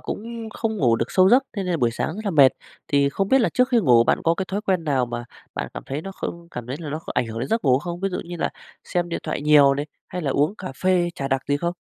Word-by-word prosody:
cũng 230 +1 -6
không 220 -1 -2
ngủ 120 - +3
được 115 - -2
sâu 185 0 +5
giấc, 255 +5 +6
thế 200 -3 -3
nên 180 - -3
là 170 - +1
buổi 120 -5 +2
sáng 155 +7 -3
rất 215 - -7
là 200 - 0
mệt. 140 -6 +6 0.4
Thì 140 -1 +3
không 195 +7 -1
biết 265 0 +5
là - - +3
trước 250 0 +2
khi 245 -3 +3
ngủ 120 - +5
bạn - - +2
có 165 +1 +3
cái 190 - -2
thói 200 +1 -2
quen 190 -6 0
nào 135 -4 +1
mà 120 0 -5 0.3
bạn - - -3
cảm - - -6
thấy 140 +3 -4
nó 195 +2 -7
không 170 -2 -6
cảm 120 -1 -7
thấy 130 +3 -4
là 160 - -6
nó 155 - -3
có - - -7
ảnh 120 - +1
hưởng 115 0 -6
đến 120 - -3
giấc 225 -3 0
ngủ 130 -2 +4
không? 175 +2 -6
Ví 195 - 0
dụ 180 - -4
như 175 +1 -7
là - - 0 0.4
xem 175 -1 -1
điện 170 - -3
thoại 155 - -3
nhiều 145 -2 +6
này, 145 +2 -3 0.2
hay 180 0 -5
là 140 - 0
uống 145 +8 +1
cà 185 - -6
phê, 185 -2 +3
trà 135 -3 -3
đặc 135 -1 0
gì 145 - +2
không? 170 +3 -2
170 Hz, 315 wpm, -23 LUFS, 135-195 Hz, 0.4 s, giấc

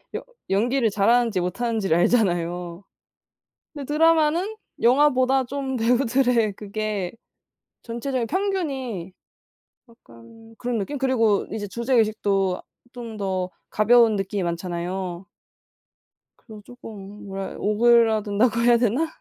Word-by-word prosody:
여 - - -3 0.3
연기를 230 +5 +2
잘하는지 215 +1 +2
못하는지를 195 0 0
알잖아요. 175 -3 0 0.9
근데 290 -3 -7
드라마는 330 +5 +2 0.2
영화보다 260 +1 +3
좀 265 +1 -4
배우들의 245 -1 +2
그게 205 -2 -4 0.7
전체적인 240 +1 -3
평균이 275 - -3 0.8
약간 225 - -17
그런 245 -1 -2
느낌? 285 +9 -4
그리고 230 -6 +1
이제 210 -1 -4
주제의식도 210 -4 0 0.3
좀 235 -3 -8
더 190 -2 -2 0.2
가벼운 225 +1 +4
느낌이 195 0 -2
많잖아요. 175 +1 -4 1.1
그리고 215 -3 -13
쪼끔 210 -3 -11
뭐라해 195 0 -6
오그라든다고 220 0 +3
해야 240 0 +5
되나? 245 +7 +1
225 Hz, 270 characters per minute, -23 LUFS, 195-250 Hz, 1.1 s, 해야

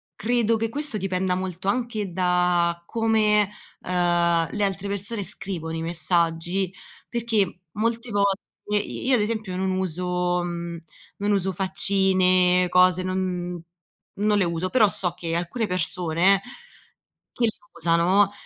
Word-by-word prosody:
credo 230 0 +1
che 225 0 -1
questo 285 -1 -2
dipenda 185 -1 -1
molto 185 0 -5
anche 215 -4 -1
da 180 -1 +1
come, 215 -2 +2 0.3
uhm, 175 -2 +2
le 210 - -1
altre 195 0 -1
persone 200 +2 -3
scrivono 165 -5 -3
i 165 - -4
messaggi, 170 +2 0 0.3
perché 220 -6 0
molte 230 +2 -2
volte 200 -2 +1 0.4
i - - -6
io 265 - +4
ad 240 - +4
esempio 215 -3 -3
non 190 +1 -1
uso, 180 -1 -1
mhmm, 170 -1 -5 0.3
non 205 +1 -1
uso 195 -1 +1
faccine, 185 -1 +3
cose, 180 0 +4
non 180 -2 -3 0.6
non 210 0 +2
le 190 - +2
uso, 170 +2 -2
però 225 -3 +4
so 180 -3 +1
che 165 -1 -4
alcune 190 +6 -2
persone, 180 +2 +2 0.9
che 245 - -3
le 225 - +3 0.3
usano, 175 +5 +3
185 Hz, 135 wpm, -24 LUFS, 175-205 Hz, 0.9 s, io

